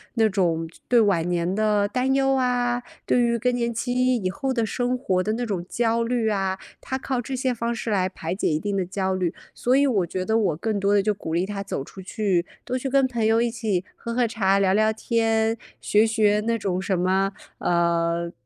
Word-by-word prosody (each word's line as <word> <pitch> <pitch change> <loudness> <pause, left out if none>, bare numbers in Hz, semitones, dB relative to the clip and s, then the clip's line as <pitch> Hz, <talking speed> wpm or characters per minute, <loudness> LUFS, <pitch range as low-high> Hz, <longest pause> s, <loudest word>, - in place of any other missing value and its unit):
那 220 -1 +3
种 170 -4 0 0.2
对 245 -1 +5
晚 185 -5 +2
年 175 +1 0
的 210 -1 +2
担 255 +4 0
忧 270 0 +3
啊， 245 -1 +1 0.2
对 - - +2
于 235 0 +2
更 250 +2 +1
年 235 -1 -1
期 250 +2 +1
以 185 -4 -1
后 265 +6 -2
的 230 -2 0
生 245 +3 -1
活 190 -8 0
的 215 - -1
那 245 +2 -2
种 185 -5 -3
焦 230 0 +1
虑 230 -2 0
啊， 195 -2 0 0.2
她 265 - -4
靠 260 -1 -2
这 260 +2 -4
些 260 0 0
方 235 0 -2
式 225 - -4
来 190 -3 +2
排 165 -2 -5
解 - - -1
一 155 0 +1
定 205 +3 -2
的 185 - 0
焦 190 0 -1
虑， 180 -3 -1 0.2
所 250 +2 +2
以 280 +1 +4
我 200 -8 +1
觉 185 +2 -3
得 220 +3 +2
我 190 -8 +1
更 215 +1 -1
多 200 +1 +2
地 200 - +4
就 210 0 +2
鼓 160 -4 -6
励 175 +3 +1
她 200 -1 -4
走 170 -8 -4
出 190 - -13
去， 190 -3 0 0.2
多 255 - -1
去 265 +1 -3
跟 270 0 +3
朋 235 -3 -1
友 225 +1 +3
一 235 - +1
起 215 -6 -1
喝 235 - -6
喝 245 -1 +2
茶 200 -3 +2
聊 190 -1 +3
聊 215 +1 +3
天， 225 0 +1 0.2
学 210 +1 +3
学 215 -2 +2
那 230 0 +1
种 185 -3 -2
什 190 -1 0
么， 190 +2 +1 0.3
呃， 170 0 +1
215 Hz, 245 characters per minute, -24 LUFS, 190-240 Hz, 0.3 s, 对